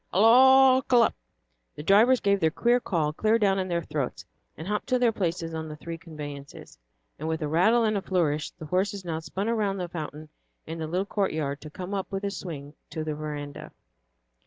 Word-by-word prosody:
"Halloo 260 +5 +6
k 250 - +4
lup!" 235 - +4 0.6
The 150 - -7
drivers 220 +9 +5
gave 200 0 +2
the 160 - +3
queer 240 +8 +2
call 160 -9 -1
clear 220 +7 +2
down 195 -3 +2
in 185 - -2
their 170 -2 -1
throats, 145 -5 -4 0.3
and 160 - -7
hopped 210 +1 -2
to 255 -1 +2
their 245 -2 +3
places 170 -5 -2
on 160 0 -4
the 150 - -7
three 165 +2 -7
conveyances, 145 -5 -9 0.4
and 155 - -4
with 160 0 -2
a - - -1
rattle 210 +10 +3
and 215 -1 +1
a 200 - 0
flourish 160 -6 0
the 155 - -11
horses 190 +3 -1
now 160 -2 -2
spun 185 +6 -4
around 210 -4 0
the 180 -2 -3
fountain 155 -2 -7 0.4
in 165 +1 -6
the 160 - -3
little 180 +4 -1
courtyard 155 -9 -2
to 155 - -9
come 180 +5 -7
up 195 0 -3
with 195 0 -3
a 200 - -1
swing 150 -7 -7 0.2
to 160 - -4
the 155 -1 -3
veranda. 150 -1 -6
175 Hz, 205 wpm, -27 LUFS, 155-205 Hz, 0.6 s, Halloo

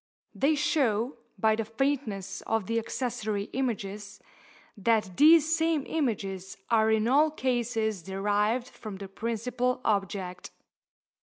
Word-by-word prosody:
They 295 +3 +2
show, 260 -5 +1 0.2
by 220 +2 +3
the 225 - -1
faintness 225 -4 -2
of 225 -3 0
the 230 +2 0
accessory 220 -3 -3
images, 210 -5 -3 0.6
that 210 -2 +1
these 320 +1 +6
same 320 -3 +1
images 195 - -2
are 220 -1 +4
in 220 0 +2
all 290 +5 +5
cases 240 - -1
derived 205 +6 0
from 215 -5 -9
the 195 0 -7
principal 235 +4 -2
object. 195 -3 -1
225 Hz, 120 wpm, -28 LUFS, 205-255 Hz, 0.6 s, these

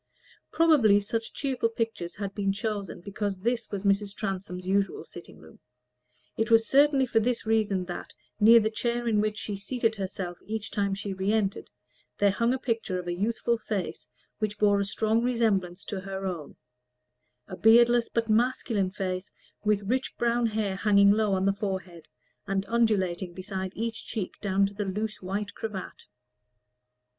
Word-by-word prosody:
Probably 285 -12 +5
such 225 +3 -3
cheerful 265 -5 -1
pictures 225 -6 -3
had 200 -1 -4
been 195 -1 0
chosen 200 -2 -4
because 200 +1 -3
this 235 +5 -1
was 200 -1 -4
Mrs. 200 0 +1
Transome's 185 -3 -4
usual 195 +1 0
sitting - - -12
room: - - -16 0.8
it 225 +1 0
was 225 0 +5
certainly 280 -1 +4
for 235 -2 +2
this 235 +1 -1
reason 215 -4 +1
that, 175 - -7 0.2
near 230 +3 +8
the 220 0 0
chair 240 +1 -2
in 215 -2 +3
which 210 0 -1
she 205 - -4
seated 225 +2 -1
herself 185 -2 -4
each 215 -1 -5
time 200 -1 0
she 195 0 -4
re 190 +2 -1
entered, 210 -3 -1 0.5
there 205 -1 +4
hung 230 +4 +1
a 260 - +1
picture 225 -7 -2
of 180 - -5
a 175 - -2
youthful 230 +4 0
face 205 -6 -4 0.3
which 210 -1 -2
bore 205 -1 +4
a 200 - 0
strong 220 +3 +1
resemblance 210 -7 0
to 200 - -4
her 195 0 -5
own: 175 -6 -5 0.9
a - - -7
beardless 235 +3 +5
but 230 -1 -1
masculine 220 -3 +1
face, 185 -1 -4 0.3
with 210 -1 +2
rich 255 +6 -2
brown 235 0 +2
hair 215 -3 -1
hanging 200 -1 +5
low 210 -1 +2
on 190 0 +1
the 195 - +3
forehead, 190 -5 -5 0.4
and 195 0 -1
undulating 190 -6 +1
beside 190 0 -4
each 225 -1 -4
cheek 210 -5 -4
down 195 -1 +2
to 200 - -4
the 205 +1 -3
loose 210 +3 -3
white 200 +2 -3
cravat. 210 -4 -7
205 Hz, 170 wpm, -27 LUFS, 195-225 Hz, 0.9 s, near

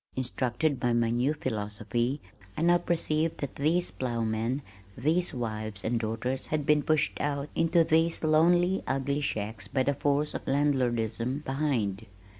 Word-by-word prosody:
Instructed 130 +3 0
by 120 -1 +1
my 115 -1 +2
new 125 +6 +1
philosophy 120 +2 -2 0.4
I 160 - 0
now 175 +1 +5
perceived 160 -2 0
that 140 - -5
these 165 +5 +1
plowmen, 115 +1 -2 0.3
these 165 +7 +1
wives 110 -4 -4
and 115 +1 +1
daughters 115 +4 -2
had 155 -2 -1
been 150 0 +4
pushed 150 0 +1
out 145 0 -2
into 165 +1 +3
these 165 +1 +2
lonely 175 +4 +4
ugly 140 +2 0
shacks 110 -5 -3
by 130 - 0
the 140 +2 +1
force 145 +2 0
of - - -6
landlordism 130 -2 0
behind. 120 -8 -1
135 Hz, 145 wpm, -28 LUFS, 120-155 Hz, 0.4 s, now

